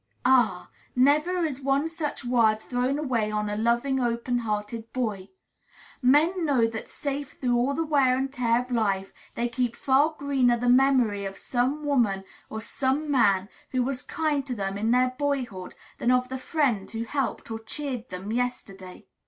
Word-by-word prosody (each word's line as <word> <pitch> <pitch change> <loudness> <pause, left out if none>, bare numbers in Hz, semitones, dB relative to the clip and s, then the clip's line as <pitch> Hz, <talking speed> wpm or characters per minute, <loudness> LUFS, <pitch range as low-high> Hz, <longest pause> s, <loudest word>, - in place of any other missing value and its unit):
Ah! 240 -8 +3 0.2
never 300 +7 +3
is 280 -3 -4
one 275 +3 +1
such 320 -5 -4
word 230 -3 +3
thrown 250 +4 -1
away 245 -8 0
on 210 0 -2
a - - -2
loving, 235 +5 +1
open 240 0 0
hearted 220 0 -4
boy. 215 -7 -3 0.7
Men 310 +8 +4
know 270 -7 +3
that 225 -1 -5
safe 285 0 -4
through 245 -2 0
all 255 +4 +1
the 330 - -1
wear 275 -4 +3
and 270 +1 -2
tear 240 -2 +2
of 250 - -14
life 195 -5 0 0.2
they 235 - 0
keep 240 0 -1
far 285 +5 +2
greener 265 -4 +2
the 245 +1 0
memory 250 -5 +4
of 195 0 -5
some 265 +5 -1
woman 230 -9 +1 0.3
or 220 - -5
some 275 +6 -1
man 200 -8 +3 0.2
who 255 -1 0
was 265 +1 -2
kind 300 -3 -1
to 250 - -3
them 195 -2 -3
in 215 +3 -1
their 250 +1 +3
boyhood 255 -10 -2 0.2
than 240 - +1
of 250 0 +2
the 260 0 -4
friend 255 - 0
who 225 0 -4
helped 245 -2 -3
or 225 - -3
cheered 255 +1 -4
them 185 +3 -6
yesterday. 200 -6 -4
250 Hz, 175 wpm, -26 LUFS, 225-275 Hz, 0.7 s, Men